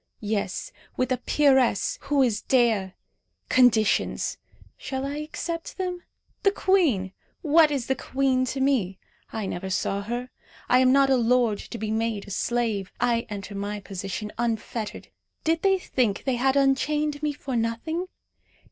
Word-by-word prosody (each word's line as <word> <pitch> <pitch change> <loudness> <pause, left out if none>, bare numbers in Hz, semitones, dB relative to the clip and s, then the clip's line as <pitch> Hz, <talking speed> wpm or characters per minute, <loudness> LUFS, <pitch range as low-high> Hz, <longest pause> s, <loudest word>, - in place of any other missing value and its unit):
Yes, 205 -3 -2 0.3
with 255 0 0
a 255 - +2
peeress, 265 -5 +2
who 280 -1 +3
is 225 -4 0
Dea! 225 -7 +2 0.6
Conditions! 235 -5 +3 0.4
Shall 265 0 -4
I 285 +1 -3
accept 330 +2 -5
them? 360 -2 -3 0.4
The 395 - +5
queen! 325 - +2 0.3
What 315 0 +5
is 275 -5 -2
the 265 - +1
queen 265 -1 0
to 260 +2 -3
me? 245 -9 +1 0.3
I 220 -2 -3
never 190 0 -4
saw 200 +1 -1
her. 240 +4 -4 0.4
I 250 - +5
am 255 0 +5
not 275 0 +4
a 265 - +5
lord 240 -3 +2
to 235 - -7
be 215 -1 -3
made 220 -2 -1
a - - -8
slave. 220 -3 -1
I 235 -1 +1
enter 200 -1 -6
my 205 +1 -4
position 195 +2 -5
unfettered. 230 -1 -3 0.3
Did 325 0 +1
they 385 -1 +4
think 245 - -1
they 260 -3 0
had 265 +2 +2
unchained 290 +2 +1
me 300 -1 0
for 280 -2 -5
nothing? 235 +10 -2
250 Hz, 155 wpm, -25 LUFS, 215-280 Hz, 0.6 s, The